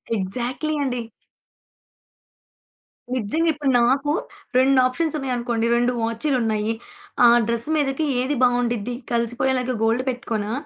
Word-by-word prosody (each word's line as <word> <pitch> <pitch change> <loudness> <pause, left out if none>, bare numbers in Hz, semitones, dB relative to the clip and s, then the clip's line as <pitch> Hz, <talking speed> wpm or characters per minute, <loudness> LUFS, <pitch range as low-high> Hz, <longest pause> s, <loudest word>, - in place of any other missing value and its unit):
Exactly 245 +9 -2
అండి. 250 -2 -2 2.1
నిజంగా 310 +9 0
ఇప్పుడు 290 -2 -2
నాకు 275 +4 +2 0.5
2 265 +1 +4
ఆప్షన్స్ 310 +5 -1
ఉన్నాయనుకోండి, 240 -4 -1
2 240 +1 +2
వాచీలున్నయ్యి. 225 -2 0 0.5
ఆ - - +9 0.2
డ్రెస్ 235 +3 -1
మీదకి 290 0 0 0.2
ఏది 280 +3 -1
బాగుండిద్ది? 245 -2 +1 0.2
కలిసిపోయేలాగా 250 +2 0
గోల్డ్ 230 +3 +2
పెట్టుకోనా? 225 -4 -3
245 Hz, 100 wpm, -22 LUFS, 235-270 Hz, 2.1 s, ఆ